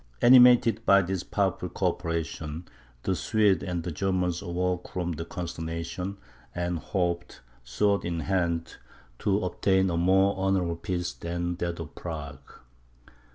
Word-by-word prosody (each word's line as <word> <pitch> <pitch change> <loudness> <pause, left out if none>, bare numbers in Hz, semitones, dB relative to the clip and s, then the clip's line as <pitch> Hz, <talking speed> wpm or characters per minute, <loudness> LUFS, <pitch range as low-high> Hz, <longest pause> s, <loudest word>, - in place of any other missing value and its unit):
Animated 120 -2 +7
by 100 -2 +5
this 95 0 -2
powerful 95 -2 -1
co 90 +1 +1
operation, 85 -2 -4 0.4
the 95 - 0
Swedes 105 0 +2
and 85 -3 -3
Germans 90 -2 0
awoke 90 0 -2
from 90 -1 -3
the 80 0 -5
consternation, 85 +3 -5 0.4
and 85 -1 -2
hoped, 85 0 -2 0.2
sword 100 +13 +1
in 85 -1 -2
hand, 85 -3 -1 0.4
to 100 0 +1
obtain 95 -1 +2
a 85 - -1
more 95 +3 +3
honourable 95 -3 0
peace 90 0 -3
than 85 +1 -3
that 85 -1 -3
of 80 -1 -7
Prague. 70 -5 -8
90 Hz, 130 wpm, -27 LUFS, 85-95 Hz, 0.4 s, Animated